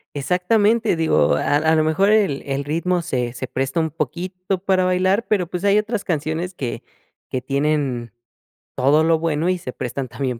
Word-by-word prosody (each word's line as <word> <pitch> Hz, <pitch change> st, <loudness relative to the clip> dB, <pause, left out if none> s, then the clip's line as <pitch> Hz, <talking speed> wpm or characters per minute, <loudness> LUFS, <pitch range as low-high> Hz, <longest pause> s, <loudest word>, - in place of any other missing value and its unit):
Exactamente, 205 Hz, -, +2 dB
digo, 160 Hz, -1 st, +2 dB
a 145 Hz, -, +1 dB
a 160 Hz, +2 st, +2 dB
lo 155 Hz, -, +3 dB
mejor 160 Hz, +6 st, +2 dB
el 205 Hz, -10 st, +2 dB
el 140 Hz, 0 st, -2 dB
ritmo 170 Hz, +4 st, 0 dB
se 125 Hz, -7 st, -2 dB
se 130 Hz, -, -5 dB
presta 135 Hz, +7 st, -2 dB
un 160 Hz, -1 st, -1 dB
poquito 180 Hz, +5 st, -3 dB
para 185 Hz, 0 st, +1 dB
bailar, 185 Hz, +4 st, +1 dB
pero 200 Hz, -4 st, +1 dB
pues 180 Hz, +2 st, -5 dB
hay 200 Hz, 0 st, +4 dB
otras 215 Hz, 0 st, -1 dB
canciones 165 Hz, +2 st, -2 dB
que 125 Hz, -7 st, -4 dB, 0.5 s
que 130 Hz, -, -2 dB
tienen 140 Hz, -3 st, -1 dB, 0.6 s
todo 145 Hz, +5 st, +3 dB
lo 165 Hz, 0 st, +3 dB
bueno 165 Hz, +1 st, 0 dB
y 185 Hz, -, +1 dB
se 130 Hz, -7 st, -7 dB
prestan 130 Hz, +2 st, -4 dB
también 125 Hz, -1 st, -4 dB
160 Hz, 180 wpm, -21 LUFS, 140-185 Hz, 0.6 s, hay